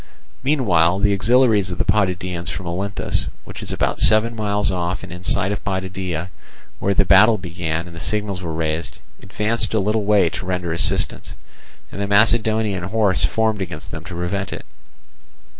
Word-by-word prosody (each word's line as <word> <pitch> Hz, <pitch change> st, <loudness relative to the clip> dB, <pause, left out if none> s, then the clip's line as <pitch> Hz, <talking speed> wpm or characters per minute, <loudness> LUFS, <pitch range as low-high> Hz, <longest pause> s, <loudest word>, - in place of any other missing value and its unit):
Meanwhile 95 Hz, -, +2 dB
the 100 Hz, 0 st, +2 dB
auxiliaries 110 Hz, -1 st, +3 dB
of 90 Hz, -, -5 dB
the -, -, 0 dB
Potidæans 90 Hz, -3 st, 0 dB
from 95 Hz, -, -5 dB
Olynthus, 95 Hz, +4 st, -2 dB, 0.2 s
which -, -, -9 dB
is -, -, -5 dB
about -, -, -1 dB
seven 110 Hz, +3 st, +4 dB
miles 105 Hz, -2 st, 0 dB
off 90 Hz, +1 st, -2 dB
and 95 Hz, -, -9 dB
in 90 Hz, 0 st, -9 dB
sight 95 Hz, +1 st, +1 dB
of 105 Hz, -, -4 dB
Potidæa, 95 Hz, -3 st, -3 dB, 0.5 s
when 100 Hz, 0 st, 0 dB
the 100 Hz, -, +3 dB
battle 105 Hz, +5 st, +6 dB
began 85 Hz, -3 st, -4 dB
and 85 Hz, -1 st, -11 dB
the -, -, -8 dB
signals 105 Hz, 0 st, -2 dB
were 85 Hz, -2 st, -4 dB
raised, 80 Hz, 0 st, -3 dB, 0.2 s
advanced 110 Hz, +3 st, -1 dB
a -, -, +3 dB
little 105 Hz, +2 st, 0 dB
way 100 Hz, -4 st, +4 dB
to 85 Hz, -, -5 dB
render 90 Hz, -2 st, -2 dB
assistance; 85 Hz, -, 0 dB, 0.6 s
and 100 Hz, -, -6 dB
the 100 Hz, -, -1 dB
Macedonian 110 Hz, -2 st, +2 dB
horse 100 Hz, -3 st, +1 dB
formed 110 Hz, +4 st, 0 dB
against 95 Hz, -, -6 dB
them -, -, -7 dB
to -, -, -7 dB
prevent 90 Hz, +3 st, -3 dB
it. -, -, -7 dB
95 Hz, 175 wpm, -20 LUFS, 90-105 Hz, 0.6 s, battle